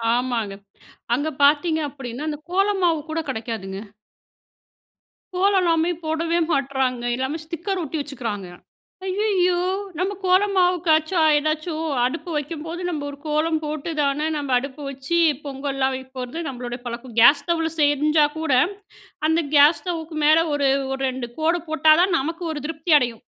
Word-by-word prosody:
ஆமாங்க. 240 Hz, -5 st, -1 dB, 0.6 s
அங்க 285 Hz, +5 st, -1 dB
பார்த்திங்க 310 Hz, +3 st, +4 dB
அப்படின்னா 270 Hz, 0 st, -6 dB
அந்த 300 Hz, -1 st, -3 dB
கோலமாவு 375 Hz, -4 st, +2 dB
கூட 325 Hz, +1 st, -1 dB
கெடைக்காதுங்க. 220 Hz, -5 st, -5 dB, 1.6 s
கோலம்லாமே 360 Hz, -4 st, +3 dB, 0.2 s
போடவே 330 Hz, +2 st, 0 dB
மாட்றாங்க 265 Hz, -3 st, 0 dB
எல்லாமே 265 Hz, +5 st, -2 dB
ஸ்டிக்கர் 345 Hz, +4 st, -4 dB
ஒட்டி 320 Hz, 0 st, -4 dB
வச்சுக்கிறாங்க. 235 Hz, -9 st, -5 dB, 0.6 s
"ஐயயோ 375 Hz, -3 st, +1 dB, 0.4 s
நம்ம 385 Hz, +3 st, -1 dB
கோலமாவுக்காச்சும் 360 Hz, -4 st, +3 dB
ஏதாச்சும் 310 Hz, +2 st, -2 dB, 0.2 s
அடுப்பு 325 Hz, +7 st, -3 dB
வைக்கும்போது 320 Hz, +3 st, -5 dB
நம்ம 300 Hz, -4 st, -3 dB
ஒரு 285 Hz, -, -9 dB
கோலம் 310 Hz, +1 st, +1 dB
போட்டுதானே 300 Hz, -1 st, -1 dB
நம்ம 280 Hz, -3 st, -2 dB
அடுப்பு 275 Hz, +3 st, -8 dB
வச்சு 275 Hz, +5 st, -2 dB, 0.3 s
பொங்கல்லாம் 270 Hz, -1 st, -2 dB
வைக்க 260 Hz, 0 st, -8 dB
போறது 250 Hz, +7 st, -5 dB
நம்மளோட 245 Hz, -2 st, -5 dB
பழக்கம் 240 Hz, 0 st, -7 dB
"கேஸ் 285 Hz, +5 st, +7 dB
ஸ்டவ்ல 330 Hz, 0 st, 0 dB
செஞ்சா 300 Hz, +1 st, +4 dB
கூட 320 Hz, -3 st, 0 dB, 0.8 s
அந்த 325 Hz, +1 st, +2 dB
கேஸ் 290 Hz, +3 st, +6 dB
ஸ்டவ்வுக்கு 330 Hz, -3 st, -4 dB
மேல 310 Hz, +1 st, +6 dB, 0.2 s
ஒரு, 285 Hz, -1 st, +2 dB, 0.2 s
ஒரு 270 Hz, 0 st, -3 dB
ரெண்டு 255 Hz, -2 st, -5 dB
கோடு 330 Hz, +2 st, +1 dB
போட்டா 315 Hz, 0 st, +5 dB
தான் 365 Hz, -2 st, +2 dB
நமக்கு 330 Hz, +5 st, -4 dB
ஒரு 295 Hz, -, -5 dB
திருப்தி 320 Hz, +1 st, -2 dB
அடையும். 240 Hz, -4 st, -3 dB
310 Hz, 130 wpm, -22 LUFS, 270-335 Hz, 1.6 s, கேஸ்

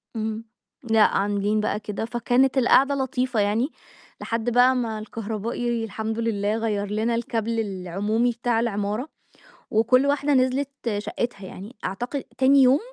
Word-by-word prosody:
إمم. 220 Hz, 0 st, -3 dB, 0.4 s
لأ 225 Hz, -2 st, +3 dB
عاملين 205 Hz, +1 st, +1 dB
بقى 210 Hz, 0 st, -1 dB
كده، 210 Hz, +1 st, -4 dB
فكانت 245 Hz, +3 st, +1 dB
القعدة 270 Hz, +2 st, +4 dB
لطيفة 260 Hz, -3 st, -1 dB
يعني 210 Hz, +6 st, +1 dB, 0.5 s
لحد 230 Hz, +1 st, -1 dB
بقى 245 Hz, +2 st, +5 dB
ما 225 Hz, -3 st, -2 dB
الكهربائي 225 Hz, +2 st, -3 dB
الحمد 220 Hz, +1 st, -4 dB
لله 210 Hz, -2 st, 0 dB
غيّر 215 Hz, -3 st, -1 dB
لنا 220 Hz, +3 st, 0 dB
الكابل 230 Hz, -1 st, -2 dB
العمومي 205 Hz, +4 st, -1 dB
بتاع 235 Hz, -1 st, 0 dB
العمارة، 215 Hz, +4 st, -2 dB, 0.6 s
وكُلّ 240 Hz, +5 st, +4 dB
واحدة 285 Hz, +1 st, +1 dB
نزلت 260 Hz, +1 st, +2 dB, 0.3 s
شَقّتها 205 Hz, 0 st, -4 dB
يعني، 205 Hz, +7 st, -10 dB
أعتق 245 Hz, +8 st, -3 dB
تاني 270 Hz, +1 st, +5 dB
يوم 260 Hz, +3 st, +5 dB
230 Hz, 135 wpm, -24 LUFS, 215-250 Hz, 0.6 s, بقى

